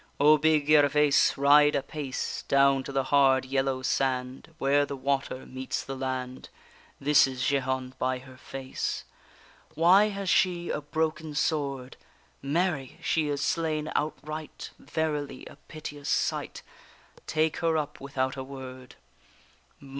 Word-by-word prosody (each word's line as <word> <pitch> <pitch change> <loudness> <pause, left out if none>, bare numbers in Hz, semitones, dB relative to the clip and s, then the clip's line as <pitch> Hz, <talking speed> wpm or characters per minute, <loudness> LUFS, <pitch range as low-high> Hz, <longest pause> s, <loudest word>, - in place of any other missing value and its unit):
O 150 +1 +6
big 155 -1 +3
Gervaise 150 -1 +4
ride 145 +1 +5
apace! 140 -1 -4
Down 140 0 +4
to - - -6
the 135 -1 0
hard 135 -2 +5
yellow 135 0 -1
sand, 130 +2 -1
Where 140 +1 +3
the 140 0 -4
water 135 -1 -2
meets 130 0 -4
the 135 - -6
land. 130 -1 -4 0.5
This 145 0 +5
is 130 -1 -4
Jehane 130 -2 -1
by 130 0 0
her 130 0 -13
face. 130 0 -5 0.7
Why 180 +6 +6
has 200 -1 -5
she 175 -1 +2
a 150 - -2
broken 155 +1 -2
sword? 140 -5 -2 0.4
Mary! 145 -2 -1
she 160 -2 +1
is 140 -1 -2
slain 155 0 -1
outright; 155 +1 -4
Verily 150 -2 -3
a - - -12
piteous 145 -2 -7
sight; - - -1 0.6
Take 155 0 0
her 165 -1 +1
up 150 -2 -4
without 135 -1 -2
a 135 - -5
word! 130 -1 -10
140 Hz, 130 wpm, -27 LUFS, 130-155 Hz, 0.7 s, O